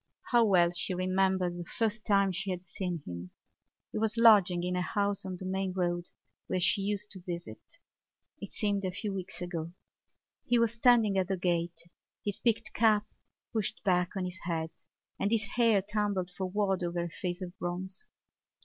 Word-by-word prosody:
How 240 -1 +6
well 180 -5 +4
she 180 +1 -2
remembered 185 -1 +1
the 175 - -5
first 220 -1 0
time 200 -2 +4
she 190 +2 -2
had 180 -1 -3
seen 180 -3 -4
him; 90 0 -6 0.6
he - - -2
was 220 +1 0
lodging 200 -6 +6
in 180 0 -1
a 180 - +1
house 200 +2 0
on 185 -1 -5
the 185 - -7
main 190 0 -1
road 175 -1 -1 0.4
where 185 - 0
she 190 +2 +3
used 205 +1 -2
to 190 - -9
visit. 170 - -7 0.6
It - - -7
seemed 205 -3 0
a 185 - 0
few 200 +2 -4
weeks 185 -1 -4
ago. 170 -1 -4 0.7
He 245 - +2
was 230 -1 +2
standing 230 -4 +4
at 185 - 0
the 190 -1 -1
gate, 170 -2 -1 0.4
his 205 -1 -2
peaked 230 -2 0
cap 215 -2 +4 0.5
pushed 220 -4 -2
back 180 -2 +2
on 185 - -1
his 180 +1 -6
head 165 -2 -2 0.5
and 200 - +1
his 225 0 +2
hair 230 -5 +4
tumbled 205 -3 -1
forward 190 +1 -1
over 175 0 -1
a - - -2
face 180 +2 -3
of 180 0 -7
bronze. 185 +2 -3
190 Hz, 180 wpm, -31 LUFS, 175-205 Hz, 0.7 s, How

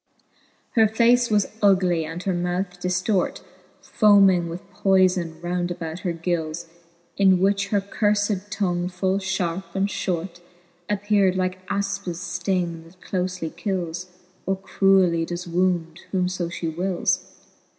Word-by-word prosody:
Her 225 -3 +5
face 235 +3 +3
was 210 -2 +3 0.2
ugly, 185 -5 +3
and 165 +3 -6
her 190 - 0
mouth 180 +1 -2
diftort, 180 +2 0 0.4
Foming 195 -5 +4
with 175 +3 -8
poyfbn 180 -4 +2
round 175 0 -1
about 165 -1 -5
her 180 - -2
gils, 170 -1 -2 0.5
In 190 -2 +5
which 200 +1 +2
her 200 0 +1
curfed 205 0 0
tongue 180 -4 -1
full 190 +1 0
fharpe 185 -2 -3
and 195 +1 +2
Ihort 175 -3 -3 0.5
Appear'd 205 -2 +2
like 185 0 -2
Afpis 200 -3 -2 0.2
fting, 175 -3 -1
that 175 +2 -19
clolely 180 -3 -3
kils, 180 -3 -3 0.4
Or 195 0 +1
cruelly 190 -3 +3
does 175 +1 -5
wound, 175 -1 0
whom 185 -2 +1
(b 180 - 0
fhe 170 -3 -3
wils. 180 +1 0
185 Hz, 130 wpm, -24 LUFS, 175-195 Hz, 0.5 s, Her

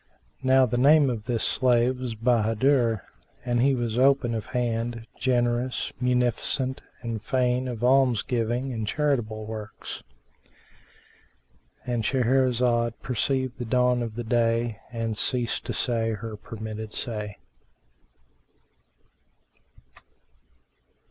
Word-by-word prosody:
Now 130 0 +5
the 120 0 -1
name 145 0 +6
of 110 -3 -5
this 120 -3 -1
slave 125 0 +2
was 125 -3 -4
Bahádur,[FN#389] 115 0 +2 0.4
and 120 -1 +1
he 135 +1 +4
was 120 -1 -1
open 135 -3 +3
of 110 -2 -4
hand, 115 -1 -2
generous, 120 0 0
munificent 125 +1 0 0.2
and 115 -2 -3
fain 125 +1 0
of 120 -2 -5
alms 125 -3 +4
giving 120 +2 -1
and 110 -2 -3
charitable 115 -6 -1
works.—And 110 - -10
Shahrazad 125 -1 +2
perceived 130 +1 -1
the 120 - -3
dawn 125 +1 +2
of 115 -2 -4
day 115 -1 +1
and 115 -2 -2
ceased 120 +2 0
to - - -3
say 115 -3 0
her 110 +1 -6
permitted 110 0 -7
say. 105 -3 -4
120 Hz, 105 wpm, -26 LUFS, 115-125 Hz, 0.4 s, name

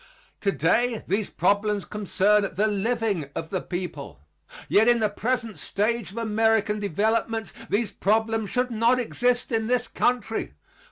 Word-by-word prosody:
Today 215 +5 +1
these 200 +2 -1
problems 205 +2 +1
concern 205 0 +1
the 205 +4 +2
living 210 - -1
of 160 0 -5
the 185 - -1
people. 175 - -6 0.5
Yet 220 +3 +4
in 240 0 +5
the 215 -1 +2
present 230 0 -2
stage 215 -1 -1
of 200 - -12
American 220 -1 +1
development 220 +4 -1 0.2
these 210 +2 0
problems 220 0 0
should 250 0 0
not 230 +2 +3
exist 245 +1 0
in 225 -1 0
this 245 0 +1
country. 225 - -1
220 Hz, 135 wpm, -25 LUFS, 200-230 Hz, 0.5 s, in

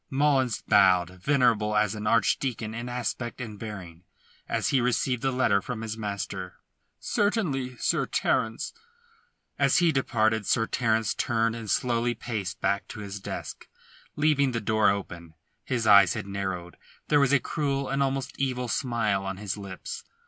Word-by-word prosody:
Mullins 135 -4 +1
bowed, 95 -2 +3
venerable 115 -5 +2
as 105 -1 +2
an 105 -1 -4
archdeacon 115 +1 +1
in 120 +2 -5
aspect 120 0 -3
and 110 -5 -7
bearing, 90 -6 -8 0.5
as - - 0
he 135 - +3
received 125 0 0
the 135 - +1
letter 115 -6 +2
from 115 0 -5
his 110 -1 -4
master: 100 -3 -5 0.4
"Certainly, 150 - -1
Sir - - 0
Terence." 115 0 0 0.9
As - - +4
he 175 -2 +4
departed 110 -6 +1
Sir 115 - +2
Terence 110 -2 +1
turned 115 -1 0
and 115 -2 -7
slowly 120 +2 +1
paced 110 -5 -4
back 100 0 0
to 105 - -8
his 100 -1 -6
desk, - - -7 0.5
leaving 145 -3 +2
the 115 - 0
door 110 -1 +3
open. 85 -5 -4 0.3
His 120 -4 -1
eyes 100 -4 +7
had - - -4
narrowed; 95 -3 -4 0.3
there 145 - +5
was 140 -2 +3
a 140 - +5
cruel, 140 0 -2
an 135 +1 -1
almost 135 0 -1
evil 125 -2 -1
smile 115 -5 0
on 95 -1 -4
his 100 -1 -3
lips. 100 -2 -7
115 Hz, 155 wpm, -27 LUFS, 100-130 Hz, 0.9 s, eyes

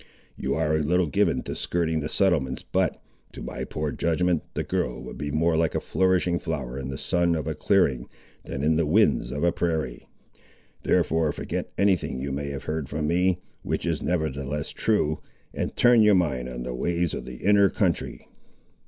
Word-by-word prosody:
You 70 +1 -2
are 80 0 +1
a 80 - +2
little 90 +4 +2
given 75 - +1
to - - -5
skirting 80 -2 -1
the 75 0 -3
settlements 75 -11 +2
but, - - 0 0.3
to - - -8
my - - -5
poor 75 -1 -3
judgment, 85 +1 +1
the - - -1
girl - - -2
would - - -8
be 75 -1 -4
more 80 +3 +2
like 80 0 +1
a - - +2
flourishing 90 -2 +1
flower 70 -7 -4
in 65 - -5
the 65 0 -5
sun 85 +2 +1
of 80 -3 -3
a - - -1
clearing, 70 -11 +2 0.4
than 70 - -5
in 80 +1 +3
the 80 -2 +1
winds 80 - +3
of 75 +5 -3
a 85 - +4
prairie. 80 -8 -2 0.7
Therefore 80 -2 +2
forget - - -4
any 100 -1 +4
thing 70 -6 -5
you 70 +1 -3
may 70 +1 -3
have 70 -1 -5
heard 75 -3 -3
from 75 +1 -2
me, 90 +3 +2 0.2
which - - -2
is 85 -3 -1
nevertheless 75 -4 -2
true, 80 -9 +1 0.3
and - - -3
turn 120 -2 +6
your 105 -2 +6
mind 65 -9 0
on - - -6
the 60 0 -4
ways 85 +5 -1
of - - -5
the 65 - -8
inner 100 +7 +4
country." 95 -6 -1
80 Hz, 195 wpm, -26 LUFS, 70-90 Hz, 0.7 s, turn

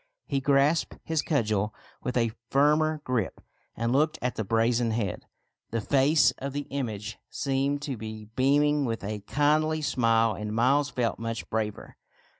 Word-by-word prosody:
He 140 - -1
grasped 140 +4 +2
his 160 -2 0
cudgel 110 -7 0 0.3
with 125 - -2
a 115 -2 +2 0.2
firmer 150 +2 +3
grip, 125 -8 -1 0.4
and 115 +1 -1
looked 150 +3 +2
at 125 -1 -1
the 110 - -3
brazen 115 +3 +2
head. 110 -4 -2 0.4
The 115 - -1
face 135 +5 +4
of 140 0 -4
the 145 0 -3
image 110 -6 -4
seemed 140 +1 -1
to 140 -5 -3
be 110 0 -7
beaming 145 +2 +3
with 115 -3 -3
a 105 +1 -3
kindly 155 +5 +1
smile, 115 -4 +2
and 105 0 -5
Miles 135 +5 +3
felt 125 -2 -1
much 115 -1 -4
braver. 110 -1 -3
125 Hz, 155 wpm, -27 LUFS, 115-145 Hz, 0.4 s, face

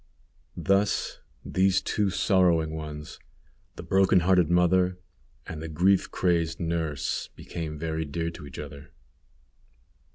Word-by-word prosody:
Thus 100 +1 +1 0.3
these 95 +1 +2
two 100 +1 0
sorrowing 90 -5 +2
ones, 75 -1 -7 0.6
the - - -8
broken 95 -1 +4
hearted 90 -2 +3
mother 90 +1 +3 0.5
and 80 - -7
the 80 - -5
grief 90 +5 +2
crazed 85 -3 0
nurse, 80 -4 -2
became 80 -3 -6
very 80 +1 -2
dear 85 +3 -3
to 80 -3 -10
each 70 - -11
other. 75 +1 -9
85 Hz, 120 wpm, -27 LUFS, 80-95 Hz, 0.6 s, broken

